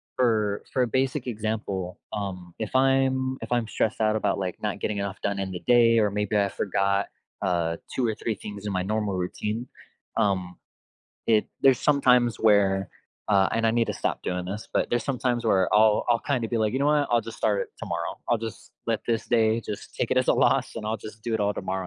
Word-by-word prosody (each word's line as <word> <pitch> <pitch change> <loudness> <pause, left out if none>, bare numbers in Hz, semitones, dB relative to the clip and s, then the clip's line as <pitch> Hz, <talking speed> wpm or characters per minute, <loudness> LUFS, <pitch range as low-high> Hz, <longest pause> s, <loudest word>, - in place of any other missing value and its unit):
for 110 -5 +1
for 130 - +2
a - - 0
basic 130 +3 -1
example, 105 -5 -3
um, 90 -4 -5
if 110 - -4
I'm 130 0 +2
if - - -7
I'm 120 -2 +1
stressed 110 0 -1
out 110 0 +3
about, 110 - 0
like, 90 -2 -3
not - - -2
getting 105 -1 -2
enough 100 0 -3
done 100 -1 -1
in 95 -1 -3
the 90 - -5
day 115 -2 +6
or 105 -2 +2
maybe 105 +1 0
I 100 -1 +3
forgot, 100 0 0 0.3
uh, 85 -3 0 0.2
2 130 - 0
or 110 - -1
3 110 0 -2
things 100 +1 -8
in - - -2
my 95 -1 0
normal 105 0 -1
routine, 105 +6 -3 0.5
um, 95 -3 0 0.7
it 110 -2 +3 0.2
there's 135 -3 +6
sometimes 125 -5 +3
where, 100 -3 +3 0.4
uh 100 -2 +4
and 115 0 +1
I - - +4
need 115 0 +2
to - - 0
stop - - -2
doing 90 0 -2
this, 100 +4 -5
but - - +1
there's 120 -1 0
sometimes 125 -3 -1
where 95 -5 +2
I'll 105 0 +5
I'll, 120 -1 +4
kinda 125 -5 -1
be, 120 - -1
like, 110 -1 +1
"You 130 - 0
know 140 - +2
what? 150 -1 +3
I'll 120 - +4
just 115 - -9
start 100 -2 +1
it - - -8
tomorrow, - - -4
I'll 120 - +3
just 115 0 -8
let 115 -2 0
this 115 -2 0
day 115 -1 +3
just 105 -2 -7
take - - -2
it - - +1
as - - +2
a - - +7
loss, - - +2
and 110 - -5
I'll 110 +1 -1
just 110 0 -11
do 115 0 -2
it 110 - 0
all 105 0 +2
tomorrow 95 0 -3
110 Hz, 225 wpm, -26 LUFS, 100-120 Hz, 0.7 s, a